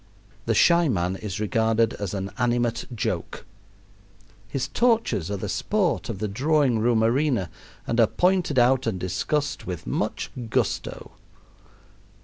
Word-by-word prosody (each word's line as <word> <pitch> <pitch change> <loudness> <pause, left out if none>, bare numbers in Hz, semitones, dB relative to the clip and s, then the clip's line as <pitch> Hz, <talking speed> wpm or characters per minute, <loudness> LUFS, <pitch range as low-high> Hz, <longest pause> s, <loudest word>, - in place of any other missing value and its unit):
The - - +2
shy 170 -2 +5
man 90 -4 0
is 105 +1 -5
regarded 110 +1 +1
as 100 -1 -4
an 95 0 -4
animate 120 -1 0
joke. 105 - -3 1.0
His 130 +4 -2
tortures 225 - +1
are 100 - -2
the 105 - -4
sport 190 - 0
of 110 - -3
the 105 +2 -2
drawing 135 +2 +2
room 115 0 +2
arena 120 - +1 0.3
and 115 - -1
are 115 - +6
pointed 180 - +1
out 125 0 +4
and 100 -5 -1
discussed 125 - -2
with 90 -3 -5
much - - -2 0.2
gusto. - - -2
115 Hz, 135 wpm, -25 LUFS, 105-140 Hz, 1.0 s, are